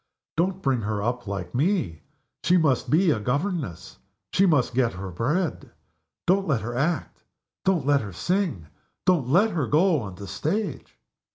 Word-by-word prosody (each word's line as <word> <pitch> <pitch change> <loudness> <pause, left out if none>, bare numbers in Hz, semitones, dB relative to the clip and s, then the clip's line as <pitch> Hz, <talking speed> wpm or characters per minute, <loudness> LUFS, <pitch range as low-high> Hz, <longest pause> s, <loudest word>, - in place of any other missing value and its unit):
"Don't 185 +3 0
bring 130 -4 +1
her 105 -1 -2
up 120 0 -2
like 95 -2 -4
Me! 130 - 0 0.4
She 180 +2 +4
must 150 -7 +2
be 170 +2 +4
a 115 - +1
governess 135 - -3 0.3
she 195 +1 +4
must 140 -8 +2
get 120 -2 +2
her 95 +1 -6
bread. 150 - -1 0.6
Don't 195 +2 +2
let 135 -8 +1
her 120 +2 -4
act! 155 +6 -1 0.4
don't 185 -7 +2
let 145 -1 +3
her 105 -2 -6
sing! 175 - -1 0.4
don't 170 -9 +3
let 200 +10 +4
her 160 -8 -1
go 165 +1 +3
on 95 -4 -7
the 100 - -8
stage!" 195 - -3
145 Hz, 165 wpm, -25 LUFS, 110-180 Hz, 0.6 s, She